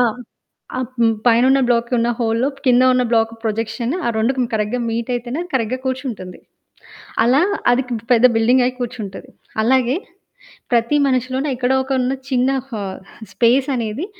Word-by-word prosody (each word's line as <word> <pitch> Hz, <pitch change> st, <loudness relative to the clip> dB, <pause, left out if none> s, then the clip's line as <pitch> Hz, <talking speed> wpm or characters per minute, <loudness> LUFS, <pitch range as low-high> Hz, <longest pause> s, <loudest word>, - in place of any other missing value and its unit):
ఆ! -, -, +6 dB, 0.7 s
ఆహ్, 255 Hz, -1 st, -2 dB
హ్మ్, 225 Hz, -1 st, +4 dB
పైనున్న 255 Hz, +4 st, +5 dB
బ్లాక్‌కి 235 Hz, 0 st, +1 dB
ఉన్న 235 Hz, -, +1 dB
హోల్‌లో 230 Hz, +3 st, +1 dB, 0.2 s
కింద 250 Hz, 0 st, +5 dB
ఉన్న 255 Hz, 0 st, +2 dB
బ్లాక్ 225 Hz, -1 st, +2 dB
ప్రొజెక్షన్ 225 Hz, +2 st, -2 dB
ఆ -, -, +2 dB
2కి 250 Hz, +3 st, +1 dB
కరెక్ట్‌గా 215 Hz, +3 st, -1 dB
మీట్ 230 Hz, +2 st, -3 dB
అయితేనే 245 Hz, +5 st, -4 dB
కరెక్ట్‌గా 255 Hz, 0 st, -1 dB
కూర్చుంటుంది. 245 Hz, -9 st, -4 dB, 0.9 s
అలా 260 Hz, +6 st, +4 dB, 0.3 s
అదికింక 245 Hz, -2 st, -1 dB
పెద్ద 240 Hz, +1 st, +5 dB
బిల్డింగ్ 245 Hz, +3 st, +4 dB
అయ్యి 255 Hz, 0 st, -1 dB
కూర్చుంటది. 225 Hz, -5 st, -6 dB, 0.3 s
అలాగే 255 Hz, +2 st, +2 dB, 0.8 s
ప్రతి 235 Hz, +5 st, +2 dB
మనిషిలోనూ 260 Hz, +2 st, 0 dB
ఎక్కడో 255 Hz, +1 st, +1 dB
ఒక 270 Hz, -, -4 dB
ఉన్న 255 Hz, +2 st, 0 dB, 0.2 s
చిన్న 255 Hz, +1 st, +2 dB, 0.2 s
హా 215 Hz, -4 st, -4 dB, 0.5 s
స్పేస్ 255 Hz, +4 st, +3 dB
అనేది 235 Hz, -, -3 dB
245 Hz, 145 wpm, -19 LUFS, 225-255 Hz, 0.9 s, ఆ